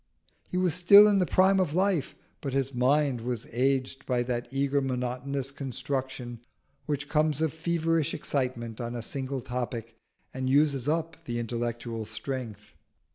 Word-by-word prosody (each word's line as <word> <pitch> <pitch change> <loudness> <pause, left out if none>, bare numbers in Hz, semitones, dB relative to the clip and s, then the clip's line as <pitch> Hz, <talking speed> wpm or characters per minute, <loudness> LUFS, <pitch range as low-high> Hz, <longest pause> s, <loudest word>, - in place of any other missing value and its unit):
He 180 - -2
was 180 -3 +2
still 200 +5 +8
in 205 -2 +4
the 180 - +2
prime 190 +1 +4
of 170 -5 0
life, 185 -6 +1 0.3
but 135 -3 -4
his 135 0 0
mind 130 0 +2
was 120 -1 -3
aged 130 +1 0
by 125 -2 +1
that 120 -1 -3
eager 140 +1 +1
monotonous 130 +1 -2
construction 130 -3 -4 0.5
which 140 -2 -2
comes 155 -1 +1
of 160 -2 0
feverish 165 -1 0
excitement 125 -6 -2
on 120 0 -4
a 120 - -4
single 135 +1 -3
topic 120 -3 -4 0.4
and 130 0 -2
uses 140 -2 +3
up 165 +1 -2
the 120 -4 -3
intellectual 120 -1 -3
strength. 115 -5 -5
135 Hz, 150 wpm, -28 LUFS, 120-155 Hz, 0.5 s, still